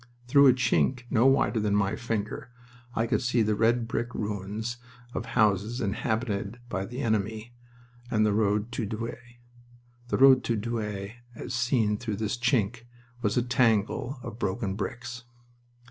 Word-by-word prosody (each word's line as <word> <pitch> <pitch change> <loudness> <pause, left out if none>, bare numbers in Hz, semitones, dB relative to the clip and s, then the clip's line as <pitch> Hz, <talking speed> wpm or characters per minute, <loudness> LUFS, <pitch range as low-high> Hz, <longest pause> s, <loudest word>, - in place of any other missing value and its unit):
Through 140 +2 +6
a 130 - +7
chink 125 0 +1
no 120 +1 +4
wider 135 -3 +3
than 105 -1 +1
my 100 -1 +1
finger 115 -1 -3 0.5
I 115 - +1
could 115 - 0
see 120 -2 +2
the 105 0 +1
red 115 +2 +2
brick 120 +1 -3
ruins 105 +3 -3 0.4
of - - -2
the 115 - -10
houses 105 +2 +2
inhabited 105 0 -2
by 95 -3 -3
the 125 +3 -5
enemy 110 +1 -1 0.6
and 110 -4 +2
the 105 - +2
road 105 +1 +1
to 115 -2 -2
Douai... 120 +2 -6 0.7
The - - 0
road 130 -1 +7
to 115 - +1
Douai 105 -1 -4 0.2
as 125 - -6
seen 115 -3 +1
through 110 -4 -3
this 110 +2 -2
chink 115 -1 0 0.4
was 105 -1 0
a 125 - +3
tangle 120 +1 +1
of 110 - -7
broken 95 0 -1
bricks. 120 +4 -5
115 Hz, 160 wpm, -28 LUFS, 105-120 Hz, 0.7 s, a